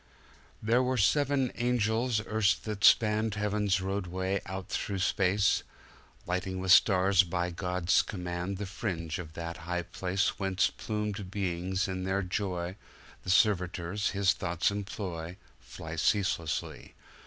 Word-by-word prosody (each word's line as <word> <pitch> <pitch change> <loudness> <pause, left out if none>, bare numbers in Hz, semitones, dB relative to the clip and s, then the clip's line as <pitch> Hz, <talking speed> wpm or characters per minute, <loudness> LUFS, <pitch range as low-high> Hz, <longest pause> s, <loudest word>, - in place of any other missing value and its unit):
There 115 +4 +3
were 130 0 0
seven 135 +3 +2
angels 120 -1 +1
erst 105 -2 +1
that 105 -2 -4
spanned 110 -1 +4
Heaven's 105 -1 +1
roadway 95 0 -2
out 95 0 -5
through 100 -3 -2
space, 95 +1 +2 0.6
Lighting 95 +1 -2
with 95 0 0
stars, 95 -1 +6
by 90 0 -2
God's 90 0 +1
command, 90 0 -4
The 100 - -4
fringe 90 -4 -4
of 80 -3 -8
that 85 0 -5
high 90 +1 -3
placeWhence 95 +1 0
plumed 105 -2 -3
beings 95 0 -1
in 95 -1 -3
their 95 +1 0
joy, 90 -1 -3 0.4
The - - -7
servitors 90 0 +2
His 100 -1 +2
thoughts 85 0 0
employ, 95 -4 -5 0.2
Fly 80 0 -8
ceaselessly. 85 -3 -1
95 Hz, 125 wpm, -30 LUFS, 90-105 Hz, 0.6 s, stars